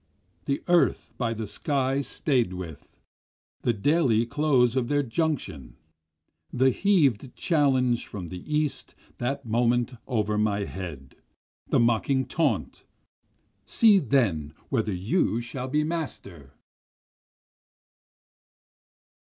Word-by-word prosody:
The 140 - -2
earth 175 -1 +2
by 115 -2 -1
the 110 0 -4
sky 135 +5 -1
staid 130 - 0
with, 85 -5 -9 0.6
the 120 - +2
daily 120 0 +2
close 130 -2 +2
of 125 -3 0
their 145 +1 +1
junction, 115 - -3 0.7
The 130 +1 +3
heav'd 140 - +1
challenge 130 -7 +1
from 90 -5 -7
the 90 -1 -7
east 150 -3 -2 0.2
that 135 +3 -2
moment 120 +2 +1
over 105 -4 0
my 105 -1 +1
head, 85 -9 -8 0.5
The - - +2
mocking 120 +3 +2
taunt, 135 - -1 0.8
See 215 -4 +5
then 100 - 0
whether 110 -5 0
you 105 - 0
shall 125 +2 -5
be 150 +3 +1
master! 100 - -6
125 Hz, 105 wpm, -26 LUFS, 105-140 Hz, 0.8 s, See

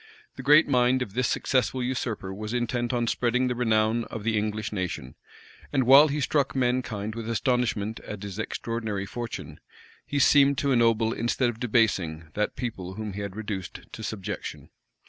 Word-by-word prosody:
The - - -7
great 150 +4 +6
mind 125 -1 +3
of 100 -6 -10
this 125 +2 +1
successful 130 0 0
usurper 115 -6 -3
was 105 +4 -5
intent 120 0 -1
on 120 -2 0
spreading 125 +2 +1
the 125 - 0
renown 115 -1 +1
of 110 - -7
the 110 0 +1
English 105 0 -2
nation; 90 - -4 0.6
and 135 -2 +2
while 135 +5 +8
he 150 0 -2
struck 140 0 +1
mankind 120 -5 -1
with 115 0 -5
astonishment 115 -2 0
at 105 -1 -8
his 100 0 -6
extraordinary 110 -2 -3
fortune, 100 -9 -6 0.5
he 145 - -2
seemed 140 0 +5
to 140 +1 +1
ennoble 115 -2 +3
instead 120 +1 0
of 115 - -14
debasing, 95 -10 +1
that 105 0 -1
people 95 -7 -5
whom 105 -1 -5
he 100 - -5
had 100 -1 -5
reduced 105 -4 -5
to - - -8
subjection. 105 -3 -5
115 Hz, 170 wpm, -26 LUFS, 105-125 Hz, 0.6 s, while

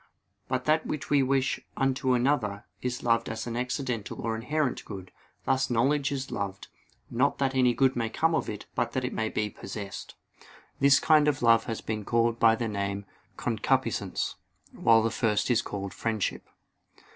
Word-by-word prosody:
But 130 -1 -2
that 155 +1 +2
which 150 - -4
we 145 -1 +5
wish 135 +1 +1 0.2
unto 130 -1 +1
another, 120 -6 +1 0.2
is 125 +1 -3
loved 115 -1 +2
as 110 0 -4
an 120 -1 -4
accidental 125 -3 -3
or 115 -1 -1
inherent 135 +4 -1
good: 95 -3 -8 0.3
thus 135 0 +1
knowledge 135 +4 +2
is 135 -1 -3
loved, 100 -1 -4 0.4
not 130 +4 +2
that 135 -1 0
any 125 -2 +3
good 135 -1 +3
may 115 -2 -1
come 160 +8 +1
to - - -5
it 105 - -7
but 120 - -1
that 130 -1 -1
it 125 - -3
may 110 0 -1
be 105 - -1
possessed. 100 0 -7 0.6
This 140 0 +6
kind 155 -2 +4
of 140 -4 +1
love 115 -1 +5
has 115 -2 -4
been 110 -1 -3
called 115 +1 +1
by 115 -1 +6
the 115 0 -2
name 100 -1 -3 0.3
"concupiscence" - - -1 0.3
while 115 -1 +4
the 115 - +1
first 110 +1 +1
is 115 -2 +3
called 100 -4 -5
"friendship." 110 -3 -2
120 Hz, 175 wpm, -28 LUFS, 110-135 Hz, 0.6 s, This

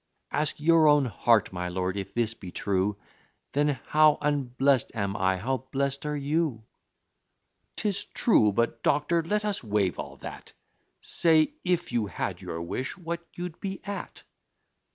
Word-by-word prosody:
Ask 150 +1 -1
your 160 0 +5
own 145 -2 +5
heart, 115 -2 +2
my 90 -1 -3
lord; 90 +1 -2
if 100 -1 -5
this 115 -1 +1
be 95 -5 -10
true, 100 +2 0 0.5
Then 145 -1 +1
how 155 0 +5
unblest 140 -2 +1
am 100 -2 -1
I! 95 -1 +1
how 130 +6 -2
blest 140 +1 -1
are 150 0 -1
you!" 145 -4 -1 1.1
"'Tis 205 -3 -1
true 110 - +3
but, 115 +3 0
doctor, 165 +3 +2
let 210 +6 -1
us 205 -8 -2
wave 100 -5 0
all - - -6
that - - -9 0.5
Say, 160 - +3
if 175 -4 0
you 115 -3 0
had 90 - -4
your 85 0 -5
wish, 130 - -4
what 170 -1 -5
you'd 175 -1 -6
be 190 -1 -4
at?" 200 -1 -6
140 Hz, 155 wpm, -27 LUFS, 105-160 Hz, 1.1 s, your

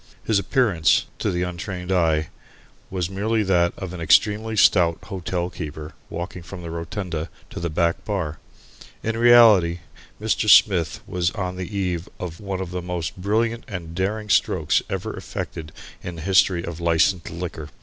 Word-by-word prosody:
His 110 -3 +2
appearance, 100 - +2
to - - 0
the 90 0 -1
untrained 90 +1 -5
eye, 80 -4 +2 0.6
was 90 -3 -2
merely 105 +4 0
that 90 -3 +3
of 95 -2 -6
an 90 - -6
extremely 105 +7 +3
stout 85 -4 +5
hotelkeeper 85 -5 -4 0.2
walking 85 +2 -5
from 85 +2 -9
the 85 - -6
rotunda 85 -1 -4 0.2
to - - -6
the 85 0 -2
back 85 +1 0
bar. 95 -8 -3 0.6
In 115 0 -1
reality, 110 -8 +6 0.4
Mr. 110 0 0
Smith 85 -9 +5
was 90 -1 0
on 95 -3 -4
the 95 +2 -5
eve 90 -3 -2
of 85 -2 -6
one 95 -2 -4
of 90 -2 -5
the 90 0 -3
most 85 -2 -4
brilliant 110 +5 0
and 85 -4 -6
daring 105 +4 -2
strokes - - +2
ever - - -3
effected 80 -2 -6 0.3
in 90 - -6
the 80 - -8
history 95 -2 +3
of 85 -1 -6
licensed 85 +2 +2
liquor. 85 -3 -6
90 Hz, 160 wpm, -23 LUFS, 85-100 Hz, 0.6 s, reality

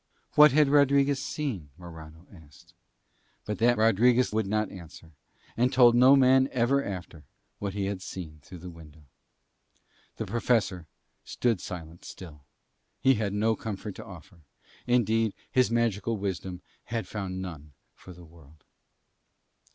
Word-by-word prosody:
What 150 -1 +8
had 150 +1 +4
Rodriguez 140 -1 +3
seen? 115 - -4
Morano 80 -1 -12
asked. 75 -5 -18 0.7
But 105 - -4
that 120 +1 +3
Rodriguez 115 +3 +3
would 110 -2 0
not 105 +1 -1
answer, 85 -2 -12 0.4
and 125 +2 +1
told 125 -3 +6
no 130 +3 +6
man 130 0 +4
ever 130 +3 +1
after 90 -5 -7 0.4
what 100 -1 -4
he 100 -1 -1
had 100 -1 -4
seen 80 -5 -8
through 90 +5 -12
that 90 +1 -9
window. 80 -2 -15 1.1
The - - -3
Professor 100 -5 0 0.4
stood 115 -6 -1
silent 85 -1 -9
still: 75 -6 -11 0.6
he 135 - +4
had 105 -4 -2
no 110 +2 +1
comfort 105 -2 -6
to - - -10
offer; 90 -1 -13 0.5
indeed 115 -3 +1 0.2
his 130 -1 +3
magical 115 -1 0
wisdom 95 -2 -5 0.2
had 115 -1 -4
found 95 -3 -5
none 75 -6 -8 0.2
for 95 - -14
the 90 -1 -13
world. 80 -2 -19
100 Hz, 140 wpm, -27 LUFS, 85-120 Hz, 1.1 s, What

